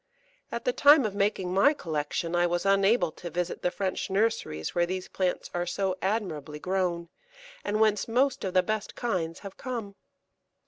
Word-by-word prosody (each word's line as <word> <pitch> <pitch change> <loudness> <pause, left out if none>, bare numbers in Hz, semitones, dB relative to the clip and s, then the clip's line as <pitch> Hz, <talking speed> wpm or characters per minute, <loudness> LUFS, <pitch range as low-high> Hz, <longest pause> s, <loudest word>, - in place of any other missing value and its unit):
At - - -4
the - - +2
time 290 - +6
of 210 - -2
making 195 -3 0
my 205 +11 +5
collection 160 - -2
I 175 0 +3
was 175 +1 -1
unable 195 -2 +3
to 175 - -8
visit 175 +2 -3
the 180 - +1
French 190 +1 -3
nurseries 195 - 0
where 175 0 +2
these 185 0 -4
plants 185 -2 -2
are 175 0 -1
so 185 +1 -1
admirably 175 -8 -2
grown, 175 -1 -1 0.5
and 210 - -1
whence 215 -2 +3
most 265 +3 +1
of 185 -2 -3
the 185 - +5
best 215 -1 -3
kinds 180 -9 -2
have 195 -2 -9
come. 230 -6 -5
190 Hz, 175 wpm, -28 LUFS, 175-215 Hz, 0.5 s, time